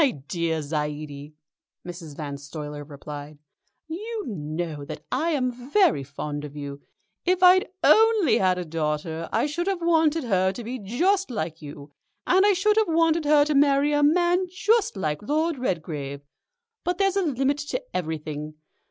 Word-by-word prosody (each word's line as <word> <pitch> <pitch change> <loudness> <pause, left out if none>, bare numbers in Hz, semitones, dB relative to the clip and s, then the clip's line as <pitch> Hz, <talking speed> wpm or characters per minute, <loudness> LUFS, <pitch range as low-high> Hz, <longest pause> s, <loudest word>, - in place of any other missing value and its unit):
"My 290 - +5
dear 160 - -3
Zaidie," 150 -1 -4 0.5
Mrs. 170 -4 -8
Van 145 -2 -4
Stuyler 145 +1 -7
replied, 145 0 -9 0.5
"you 425 +7 -5
know 155 - -4
that 150 +1 -8
I 305 +6 +1
am 260 -6 +1 0.2
very 345 - +3
fond 145 +2 -5
of 150 -1 -8
you. 140 -1 -7 0.4
If 365 +1 +1
I'd 370 +3 +7 0.2
only 440 - +5
had 185 -1 +2
a 180 - -3
daughter 160 +1 -3
I - - +2
should 340 +5 -2
have 390 -2 0
wanted 325 -2 +2
her 190 -5 +2
to 240 - -7
be 250 +3 -5
just 360 - +1
like 165 -9 -4
you, 145 -1 -10 0.3
and 380 +3 +4
I 410 - +5
should 420 +3 +2
have 440 -2 +4
wanted 330 -1 +2
her 295 0 +5
to 305 - 0
marry 285 +1 +4
a 290 - +2
man 350 +4 +3
just 410 - +1
like 155 -3 -2
Lord 305 +5 0
Redgrave. 155 - -3 0.6
But 355 0 -1
there's 390 -1 +2
a 395 - +2
limit 280 -3 0
to 290 +12 -3 0.2
everything. 155 -2 -4
215 Hz, 165 wpm, -25 LUFS, -, 0.6 s, I'd